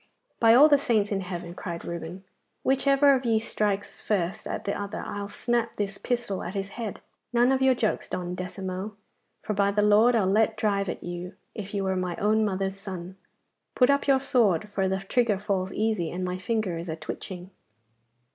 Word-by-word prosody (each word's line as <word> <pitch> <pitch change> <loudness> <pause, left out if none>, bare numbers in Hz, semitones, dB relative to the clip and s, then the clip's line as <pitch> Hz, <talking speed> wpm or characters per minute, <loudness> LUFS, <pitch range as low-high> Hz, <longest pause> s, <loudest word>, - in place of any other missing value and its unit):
'By 230 0 +6
all 285 +5 +9
the 290 -2 +5
saints 220 -7 +1
in 195 -1 0
heaven!' 175 -2 -6
cried 170 -2 -6
Reuben, 170 +2 -6 0.4
'which 270 +1 +1
ever 275 0 +6
of 260 -1 +1
ye 230 -2 +2
strikes 210 -2 -2
first 190 -4 -1
at - - -4
the 200 - -1
other 205 +1 -4
I'll 205 0 -4
snap 235 +2 -1
this 200 -1 -3
pistol 240 -6 -2
at 180 - -6
his 195 0 -2
head. 220 -1 -6 0.3
None 240 +2 +4
of 265 0 +1
your 265 -1 +5
jokes, 220 -3 -1
Don 180 -1 -3
Decimo, 185 +2 -5 0.5
for 215 - -2
by 200 0 +2
the 205 +1 +1
Lord 215 +4 +5
I'll 215 -4 +3
let 215 +3 +2
drive 200 -3 0
at - - -5
you 175 +2 -6 0.2
if 205 -1 -6
you 200 - 0
were 190 0 0
my 180 -2 -2
own 215 +2 +2
mother's 195 -1 -1
son. 185 -2 -7 0.6
Put 250 +1 +5
up 280 0 +1
your 270 -1 +4
sword, 215 - +2
for 195 -2 0
the 190 0 0
trigger 215 +1 +1
falls 190 -2 -2
easy, 215 -6 0
and 185 +1 -3
my 180 0 -3
finger 195 -4 -1
is 170 +1 -6
a 160 - -2
twitching. 180 +3 -7
200 Hz, 200 wpm, -27 LUFS, 185-225 Hz, 0.6 s, all